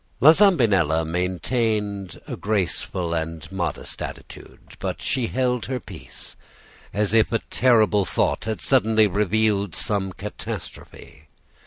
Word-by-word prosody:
"La 150 - +9
Zambinella 105 - +3
maintained 100 +3 -2
a - - -4
graceful 95 -4 -2
and 80 0 -4
modest 90 -3 -4
attitude; - - -9
but - - -3
she 125 -4 0
held 125 -2 -1
her 130 -1 -2
peace, - - -11 0.6
as 105 0 -1
if 110 -1 +4
a 115 - +3
terrible 110 -5 +4
thought 90 - 0
had 110 -1 -3
suddenly 110 -5 +3
revealed 105 -1 +1
some 100 -2 0
catastrophe. 90 -6 -8
105 Hz, 120 wpm, -23 LUFS, 90-115 Hz, 0.6 s, La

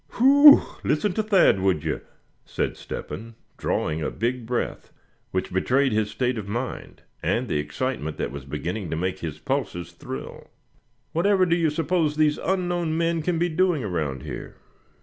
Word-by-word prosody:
"Whew! 285 +4 +8 0.2
listen 180 +6 +1
to 220 - +1
Thad, 200 - +4
would 95 -5 +1
you?" - - -2 0.4
said - - -2
Step - - -7
hen, 115 +2 -7 0.2
drawing 80 +1 -1
a - - -1
big 120 0 -2
breath, 120 0 -3 0.4
which 95 -1 -3
betrayed 130 +8 +2
his 105 -1 +1
state 120 +2 -1
of 100 - -7
mind, 120 +5 -5 0.2
and - - 0
the 75 - 0
excitement 75 - -3
that - - -2
was 70 -1 -7
beginning 85 +7 -4
to 80 - -2
make 90 +2 -2
his 80 -3 -5
pulses 85 - -3
thrill. 65 -6 -8 0.6
"Whatever 190 +3 +3
do 170 -1 +2
you 165 -2 +2
suppose 160 0 0
these 150 -1 +2
unknown 175 -3 -1
men 165 0 +1
can 170 +2 0
be 175 +2 +2
doing 175 -4 +1
around 75 - -2
here?" 75 - -7
130 Hz, 170 wpm, -25 LUFS, -, 0.6 s, Whew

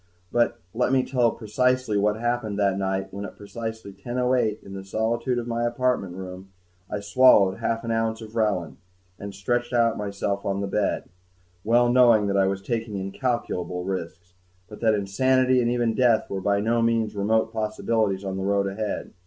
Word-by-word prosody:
But 120 0 +2 0.2
let 125 +2 +1
me 130 -1 +3
tell 125 -3 +2
precisely 125 +1 0
what 105 +1 +2
happened 115 -2 -2
that 100 -2 +2
night 95 0 -2
when 100 +1 -5
at - - -8
precisely 110 0 -7
10:08 125 0 -1
in 95 - -10
the 95 0 -6
solitude 115 +5 -1
of 120 - -2
my 120 0 -2
apartment 120 -6 0
room, 95 0 -8 0.4
I 105 - -3
swallowed 100 -3 +5
half 115 0 -1
an 115 - -3
ounce 115 0 0
of 110 -2 -10
Relin 105 -8 -1 0.4
and 100 0 -6
stretched 120 +6 -2
myself 105 -4 0
out - - -2
on 100 0 -1
the - - -1
bed, 100 +1 0 0.6
well 120 +2 +4
knowing 120 -4 +5
that 100 -1 0
I 95 -1 +3
was 95 0 -2
taking 115 -2 -3
incalculable 95 -3 -2
risks, 90 -1 -5 0.4
and 105 - -10
that 110 -2 +3
insanity 130 +6 +2
and 120 - +1
even 120 -2 +1
death 120 -2 +2
were 95 -1 -2
by 100 +1 +1
no 115 +2 +1
means 115 -2 +1
remote 110 +3 +1
possibilities 110 -2 -1
of 95 -1 -3
the - - -3
road 100 0 +1
ahead. 100 +1 -4
110 Hz, 180 wpm, -25 LUFS, 100-120 Hz, 0.6 s, swallowed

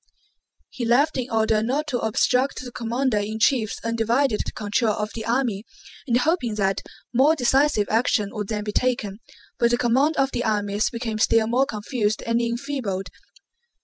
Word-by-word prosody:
He 255 - -5
left 260 +7 +3
in 255 -1 -3
order 220 -1 +2
not 265 +7 -1
to 245 - -1
obstruct 250 +5 +1
the 250 - -8
commander 240 0 -1
in 210 +2 -3
chief's 225 -2 +1
undivided 230 +2 +1
control 210 +1 0
of 210 0 -3
the 225 - -5
army, 235 -4 0 0.4
and 240 -1 +3
hoping 250 -5 0
that 195 -2 0 0.3
more 275 +6 +4
decisive 265 -5 +2
action 220 -2 +1
would 210 -3 -4
then 210 -1 -3
be 210 - -3
taken, 220 -6 -1 0.4
but 235 - +4
the 240 - +2
command 260 +6 +2
of 270 0 +2
the 240 - -2
armies 205 -1 0
became 230 -2 -4
still 225 0 +3
more 250 +4 +1
confused 215 0 -2
and 230 +1 0
enfeebled. 235 -5 -3
230 Hz, 165 wpm, -23 LUFS, 215-255 Hz, 0.4 s, more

